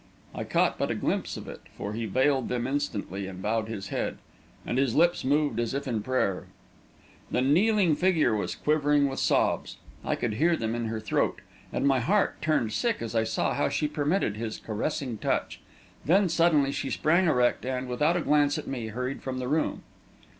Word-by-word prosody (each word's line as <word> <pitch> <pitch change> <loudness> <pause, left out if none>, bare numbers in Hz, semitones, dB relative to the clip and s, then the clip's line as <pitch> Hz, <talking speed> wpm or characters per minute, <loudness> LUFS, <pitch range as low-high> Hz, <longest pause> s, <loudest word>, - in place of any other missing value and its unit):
I - - -4
caught - - +1
but - - 0
a - - -1
glimpse - - -2
of - - -9
it, - - -8 0.2
for 100 - -4
he 115 +1 -3
veiled 130 +3 +1
them 120 -1 -1
instantly 105 -9 -3
and 95 -1 -8
bowed 110 +3 -1
his 100 -3 -6
head, - - -2 0.5
and 125 - -1
his 135 -4 +1
lips 170 +2 +3
moved 145 -3 +1
as 120 +2 -1
if 140 - -3
in 115 -4 -1
prayer. 105 -5 -1 0.8
The 125 - +1
kneeling 180 +4 +3
figure 160 -9 +2
was 105 - -2
quivering 145 -1 +2
with 135 - -4
sobs; - - +1 0.3
I - - 0
could 115 -3 -2
hear 165 +8 +2
them 110 0 -2
in 120 0 -2
her 110 0 -3
throat; 110 -2 -1 0.3
and - - -1
my 135 -2 +4
heart 195 - +1
turned 120 -9 +1
sick 235 - 0
as 115 - -5
I 110 -1 +2
saw - - 0
how - - +1
she 150 - 0
permitted 150 - 0
his 110 -1 -4
caressing 120 +1 -3
touch. - - -1 0.4
Then, 185 +4 +3
suddenly, 160 -4 +3
she 135 - -3
sprang, 170 +7 +2
erect, 125 -6 +2
and, 130 0 -3
without 150 +8 +1
a - - 0
glance 145 -1 +3
at - - -5
me, 120 -4 -4
hurried 125 +4 -4
from 130 -1 -4
the 125 -1 -3
room. 155 +4 0
130 Hz, 195 wpm, -27 LUFS, 115-150 Hz, 0.8 s, my